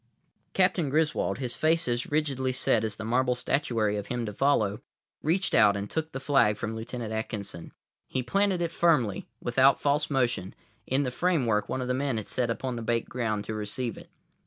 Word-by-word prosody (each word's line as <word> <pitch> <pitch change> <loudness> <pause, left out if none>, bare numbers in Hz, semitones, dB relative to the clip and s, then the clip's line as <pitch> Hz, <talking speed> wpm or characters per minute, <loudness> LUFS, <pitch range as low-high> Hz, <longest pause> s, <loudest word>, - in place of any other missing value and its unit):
Captain 185 -5 +2
Griswold, 155 +2 +1
his 125 -3 -3
face 160 -1 +2
as 120 0 -1
rigidly 140 -4 0
set 120 -3 +2
as 110 -2 -2
the 110 - -6
marble 125 +2 +2
statuary 115 -6 0
of 100 - -5
him 120 -1 -2
to 105 - -5
follow, 110 -4 +1 0.4
reached 180 +5 0
out 100 0 +5
and 100 +1 -5
took 160 0 -2
the 135 - -4
flag 135 -7 +3
from 110 0 -4
Lieutenant 115 0 -5
Atkinson. 105 -6 -5 0.4
He 130 - -2
planted 195 +3 +1
it 165 - -2
firmly, 150 - +2 0.2
without 130 +3 +4
false 145 +1 +1
motion, 120 -9 0 0.3
in 135 +2 +1
the 125 - -2
framework 125 -10 +1
one 130 - -2
of - - -4
the 125 - +1
men 135 -2 -1
had 110 - -4
set 125 -2 -1
upon 125 +1 -2
the - - -4
baked 115 0 -1
ground 110 -4 -2
to 110 - -4
receive 110 +3 -3
it. - - -13
125 Hz, 195 wpm, -28 LUFS, 110-145 Hz, 0.4 s, out